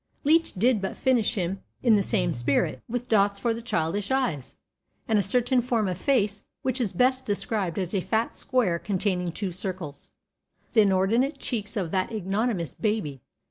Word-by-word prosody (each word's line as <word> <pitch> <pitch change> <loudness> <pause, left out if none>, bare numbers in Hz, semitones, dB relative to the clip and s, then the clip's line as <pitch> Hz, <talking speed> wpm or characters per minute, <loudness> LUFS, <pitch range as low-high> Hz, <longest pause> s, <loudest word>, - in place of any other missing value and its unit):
Leech 320 +3 +3
did 225 +2 +2
but 195 - -4
finish 245 -3 +2
him 190 0 -2 0.2
in 235 -4 +6
the 205 - +3
same - - +1
spirit, 120 +4 0
with 245 +1 -3
dots 200 -3 +3
for 230 +3 0
the 230 - -6
childish 200 -2 -1
eyes, 250 - -1 0.5
and 220 -3 +3
a - - +4
certain 245 +5 +2
form 230 -4 0
of 180 - -1
face 210 -1 +1 0.2
which 260 0 0
is 215 -6 +1
best 255 +7 +2
described 205 -5 -1
as 185 -1 -2
a 195 - +1
fat 225 +5 -1
square 210 -10 0
containing 185 -3 -1
two 190 +2 -3
circles 175 -5 -4 0.6
the 220 - +6
inordinate 205 - +2
cheeks 215 -2 -3
of 180 -5 -2
that 185 +2 0
ignominious 200 - -1
baby. 205 - -2
205 Hz, 175 wpm, -26 LUFS, 185-240 Hz, 0.6 s, in